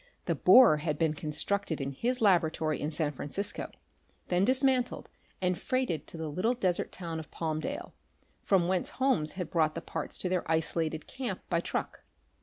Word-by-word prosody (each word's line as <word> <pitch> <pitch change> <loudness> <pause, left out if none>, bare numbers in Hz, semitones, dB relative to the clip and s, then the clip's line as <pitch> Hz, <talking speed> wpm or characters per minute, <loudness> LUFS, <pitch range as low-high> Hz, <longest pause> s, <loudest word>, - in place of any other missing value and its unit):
The - - +1
borer 245 -12 +7
had 150 0 -2
been 160 -1 +2
constructed 160 +4 -2
in 135 0 -2
his 245 - -1
laboratory 160 -6 +2
in 150 - -1
San 155 -1 -1
Francisco, 150 +8 -4 0.6
then 180 +1 +2
dismantled 260 +1 +1 0.3
and 180 -1 +1
freighted 255 - -1
to - - -9
the 160 -1 -4
little 185 +11 0
desert 185 -7 0
town 165 -3 -5
of 155 - -9
Palmdale, 160 - -4 0.5
from 185 -4 +2
whence 185 -1 0
Holmes 260 - +2
had 180 -4 -5
brought 155 -2 +2
the - - -2
parts - - -5
to - - 0
their 180 -1 0
isolated 160 -1 0
camp 245 -8 -4
by 170 - +3
truck. - - -3
170 Hz, 170 wpm, -30 LUFS, 155-200 Hz, 0.6 s, borer